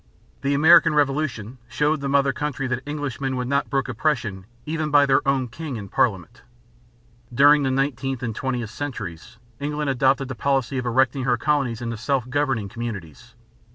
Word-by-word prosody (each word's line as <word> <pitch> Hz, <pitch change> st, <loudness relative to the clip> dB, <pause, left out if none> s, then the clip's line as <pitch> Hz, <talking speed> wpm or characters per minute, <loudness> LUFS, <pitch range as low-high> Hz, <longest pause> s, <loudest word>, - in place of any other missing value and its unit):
The 140 Hz, 0 st, +1 dB
American 150 Hz, +1 st, +6 dB
Revolution 135 Hz, -5 st, -1 dB
showed 150 Hz, +5 st, 0 dB
the 140 Hz, -, -2 dB
mother 140 Hz, -1 st, +3 dB
country 145 Hz, -2 st, -3 dB
that 130 Hz, -1 st, -2 dB
Englishmen 140 Hz, -3 st, -3 dB
would 125 Hz, -1 st, -2 dB
not 140 Hz, +1 st, 0 dB
brook 135 Hz, -2 st, 0 dB
oppression 115 Hz, -7 st, -2 dB, 0.2 s
even 155 Hz, 0 st, -2 dB
by 145 Hz, -1 st, +5 dB
their 135 Hz, -1 st, +3 dB
own 135 Hz, -2 st, +1 dB
king 140 Hz, +1 st, -6 dB
and 100 Hz, -3 st, -8 dB
parliament. 95 Hz, -8 st, 0 dB, 0.9 s
During 145 Hz, +4 st, +6 dB
the 135 Hz, -, 0 dB
nineteenth 135 Hz, -1 st, -1 dB
and 115 Hz, -3 st, -3 dB
twentieth 120 Hz, -5 st, -3 dB
centuries 110 Hz, -, -7 dB, 0.2 s
England 150 Hz, 0 st, -2 dB
adopted 135 Hz, +1 st, +2 dB
the 130 Hz, -, -5 dB
policy 135 Hz, 0 st, 0 dB
of 125 Hz, -, -4 dB
erecting 130 Hz, +2 st, +1 dB
her 125 Hz, -2 st, +2 dB
colonies 125 Hz, -4 st, 0 dB
into 115 Hz, -1 st, -4 dB
self 125 Hz, +2 st, -1 dB
governing 135 Hz, -6 st, 0 dB
communities. 100 Hz, -, -7 dB
135 Hz, 165 wpm, -23 LUFS, 120-145 Hz, 0.9 s, American